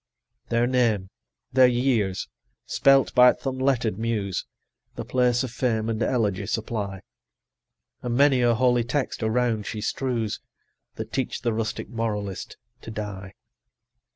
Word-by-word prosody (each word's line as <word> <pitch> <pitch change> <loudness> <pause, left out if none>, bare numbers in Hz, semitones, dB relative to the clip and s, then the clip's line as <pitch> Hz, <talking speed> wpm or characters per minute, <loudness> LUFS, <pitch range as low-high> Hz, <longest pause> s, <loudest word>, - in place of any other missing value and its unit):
80 - - -32
Their 120 +1 +2
name, 115 -7 +1 0.4
their 130 0 +7
years, 120 -6 +1 0.4
spelt 135 -1 +4
by 125 0 +8
th' - - -19
unletter'd 130 -5 0
Muse, 110 -5 -2 0.5
The - - -5
place 125 -1 +2
of 130 - -4
fame 115 -3 0
and 115 0 -2
elegy 105 -6 0
supply; 105 -4 -3 1.0
And 120 -1 -2
many 135 -1 +4
a 120 -1 +4
holy 125 0 +3
text 130 +2 -2
around 110 -1 0
she 110 - -4
strews, 115 -2 -2 0.6
That - - -7
teach 130 -1 -2
the 120 -2 +1
rustic 110 0 -3
moralist 105 -5 -4 0.2
to - - -9
die. 100 -3 -6
115 Hz, 135 wpm, -25 LUFS, 105-125 Hz, 1.0 s, by